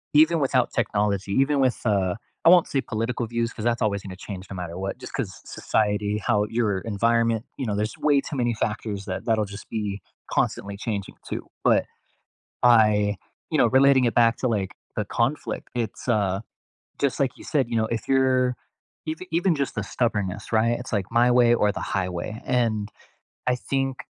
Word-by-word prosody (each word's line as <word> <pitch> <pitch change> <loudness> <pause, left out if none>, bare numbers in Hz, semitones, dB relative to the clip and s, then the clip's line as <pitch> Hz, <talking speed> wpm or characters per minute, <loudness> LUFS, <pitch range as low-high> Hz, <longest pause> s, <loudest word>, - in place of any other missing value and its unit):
even 160 +2 +6
without 130 -3 +2
technology, 100 -2 0
even 135 +3 +2
with, 130 -3 +2
uh 95 -4 +2 0.3
I - - +9
won't 180 -1 +7
say 135 - 0
political 115 +2 -2
views, 115 0 -2
'cause 110 - -7
that's 120 0 +1
always 100 -2 0
gonna 95 -2 -7
change 95 -1 -8
no 95 - -6
matter 85 -2 -5
what, 95 +1 -3
just - - -9
'cause - - -4
society 105 -1 0
how 105 0 +1
your 110 -4 0
environment 115 +2 +1
you 135 - -3
know, 105 - -1
there's 105 +1 -2
way 145 -2 +3
too 145 - -6
many 120 -2 +1
factors 105 -2 -3
that 95 -1 -4
that'll 110 -2 +2
just 100 +1 -10
be 105 -3 -3 0.3
constantly 100 0 -1
changing, 100 -2 -4 0.2
too. - - -4 0.2
But, - - +4 0.8
by, 105 -4 +4 0.3
you - - +2
know, - - +5
relating 135 0 +5
it 120 - +1
back 115 -1 +4
to, 130 - 0
like, 100 -5 -1 0.2
the - - 0
conflict, - - -2
it's, 120 +1 -4
uh, 100 -5 +1 0.6
just 140 -2 0
like 135 -3 0
you - - -12
said, 135 -5 +1
you 120 - -2
know, 110 - +2
if 115 -1 -3
you're 130 -1 +3 0.5
eve 155 0 -3
even 175 +2 +2
just 140 -2 -2
the 105 - -2
stubbornness, 105 -4 -2
right? 115 +2 +2
It's 125 0 -7
like, 100 0 -1
"My 120 +1 +4
way 120 -1 +5
or 105 -3 +3
the - - -5
highway," 90 +3 -3
and 115 -4 0 0.6
I 125 - +2
think 135 +1 -2
115 Hz, 190 wpm, -25 LUFS, 105-125 Hz, 0.8 s, I